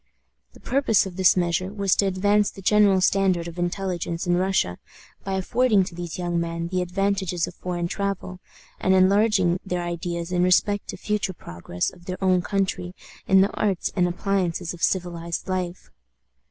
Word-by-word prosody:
The - - -17
purpose 255 -7 +2
of 185 -2 -7
this 190 0 +4
measure 180 +1 0
was 200 -2 +1
to 200 - +3
advance 205 +2 +2
the 195 - -12
general 200 -1 +4
standard 185 -3 +2
of 170 +1 -8
intelligence 175 -1 -2
in 175 0 +2
Russia 180 - 0 0.4
by 195 - -3
affording 210 +2 +2
to 180 - -7
these 170 -1 -6
young 175 -1 -1
men 170 0 -3
the 185 0 0
advantages 190 -1 -1
of - - -9
foreign 175 -1 -3
travel, 195 -1 -4 0.4
and 190 0 +3
enlarging 190 -1 +3
their 180 -2 -3
ideas 170 0 -4
in 180 -1 +1
respect 190 +3 +2
to - - -5
the - - -18
future 210 -3 -1
progress 85 - -4
of 175 - -18
their 185 0 -4
own 185 -2 +3
country 185 -2 -2 0.3
in 190 0 +6
the 200 - +2
arts 195 -4 -1
and 180 -2 +3
appliances 180 -2 -1
of 175 - -12
civilized 170 -2 -2
life. 185 -1 -4
185 Hz, 175 wpm, -24 LUFS, 175-195 Hz, 0.4 s, in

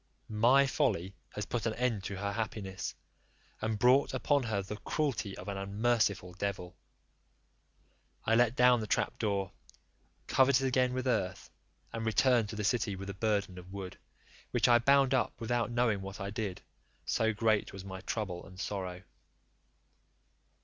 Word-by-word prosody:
My 120 +6 +5
folly 115 - 0 0.2
has 105 - -3
put 120 +1 -2
an 110 - -1
end 120 -5 0
to 100 - -4
her 100 +1 -2
happiness, 100 -3 -4 0.7
and 110 -1 -1
brought 125 +5 +4
upon 145 -1 +2
her 110 -5 -1
the 105 +2 -6
cruelty 120 -8 -2
of 95 - -9
an 100 -1 -3
unmerciful 100 -2 0
devil." 95 -1 -4 1.5
I 115 - +2
let 120 +1 +4
down 125 -1 +5
the 110 - -4
trap - - 0
door, 100 -3 -1 0.7
covered 135 0 +4
it 135 - +3
again 125 -1 +2
with 130 0 -2
earth, 110 -7 -1 0.4
and 115 -1 -3
returned 115 0 +3
to 110 - -6
the 105 - -3
city 105 -2 +1
with 100 +1 -6
a - - -7
burden 100 -2 -1
of 90 +1 -13
wood, 95 -2 -7 0.5
which - - +2
I 120 -1 +6
bound 135 +2 +4
up 130 - 0
without 120 +1 0
knowing 120 -4 +1
what 95 +1 -7
I 100 0 -4
did, 105 -4 -4 0.4
so 110 0 +1
great 110 0 +1
was 95 -1 -9
my 95 -1 -7
trouble 95 -6 -3
and 95 -1 -13
sorrow. 95 -3 -4
110 Hz, 165 wpm, -32 LUFS, 100-120 Hz, 1.5 s, I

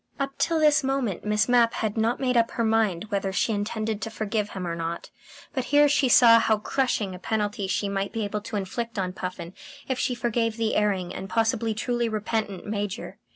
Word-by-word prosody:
Up 275 0 -2
till 330 -1 +2
this 300 -2 +4
moment 265 -9 -1
Miss 210 0 +2
Mapp 240 -2 +4
had 215 -2 -2
not 225 +2 +1
made 255 -2 0
up 230 -1 +3
her 235 - -2
mind 220 -4 +1
whether 195 -1 -1
she 220 +3 0
intended 215 +1 -2
to - - -3
forgive 215 -1 -2
him 185 -2 -5
or 170 -1 -3
not; 165 0 -5 0.4
but 260 -3 -2
here 290 +2 +5
she 280 -2 +2
saw 230 -2 +8
how 220 -1 +2
crushing 210 -3 -1
a 180 - -8
penalty 205 0 -2
she 200 +1 -1
might 195 0 -2
be 225 -1 -2
able 210 +1 -3
to 215 - -7
inflict 225 +4 -4
on 185 -2 -1
Puffin 180 -2 -6 0.3
if 260 -1 -2
she 250 - 0
forgave 235 -1 -1
the 225 -1 0
erring 195 -4 0
and 195 - -6
possibly 225 0 0
truly 240 +1 -1
repentant 215 -2 -3
Major. 205 0 -4
220 Hz, 205 wpm, -25 LUFS, 200-235 Hz, 0.4 s, saw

